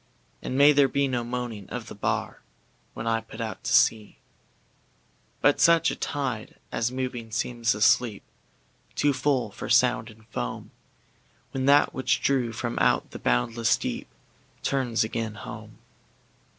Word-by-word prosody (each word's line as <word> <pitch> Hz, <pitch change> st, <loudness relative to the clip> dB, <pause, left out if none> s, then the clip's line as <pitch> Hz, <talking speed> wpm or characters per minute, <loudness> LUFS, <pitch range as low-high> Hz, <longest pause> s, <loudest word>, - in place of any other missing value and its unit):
And 130 Hz, -, -3 dB
may 145 Hz, +1 st, +8 dB
there 140 Hz, -1 st, +5 dB
be 140 Hz, +1 st, +1 dB
no 125 Hz, -2 st, -1 dB
moaning 120 Hz, -4 st, -5 dB
of -, -, -5 dB
the -, -, -9 dB
bar, -, -, -2 dB, 0.5 s
When 110 Hz, -, -5 dB
I 115 Hz, 0 st, +1 dB
put 110 Hz, 0 st, -12 dB
out 110 Hz, -2 st, -5 dB
to -, -, -1 dB
sea, 110 Hz, -2 st, +3 dB, 1.2 s
But -, -, +3 dB
such 170 Hz, -1 st, +5 dB
a -, -, -4 dB
tide 130 Hz, -7 st, -3 dB, 0.2 s
as 120 Hz, +1 st, -1 dB
moving 125 Hz, -3 st, -4 dB
seems 115 Hz, 0 st, 0 dB
asleep, 110 Hz, 0 st, +2 dB, 0.7 s
Too 145 Hz, -1 st, +2 dB
full 130 Hz, -4 st, 0 dB
for -, -, -7 dB
sound 120 Hz, -1 st, +3 dB
and 110 Hz, 0 st, -17 dB
foam, -, -, -5 dB, 0.8 s
When 130 Hz, 0 st, -2 dB
that 145 Hz, +1 st, +5 dB
which 130 Hz, -, +1 dB
drew 130 Hz, -4 st, +1 dB
from 120 Hz, +1 st, -3 dB
out -, -, +2 dB
the -, -, -8 dB
boundless 110 Hz, -, +1 dB
deepTurns 125 Hz, -5 st, -3 dB
again 110 Hz, -1 st, -3 dB
home. 100 Hz, -, -9 dB
120 Hz, 145 wpm, -26 LUFS, 110-130 Hz, 1.2 s, may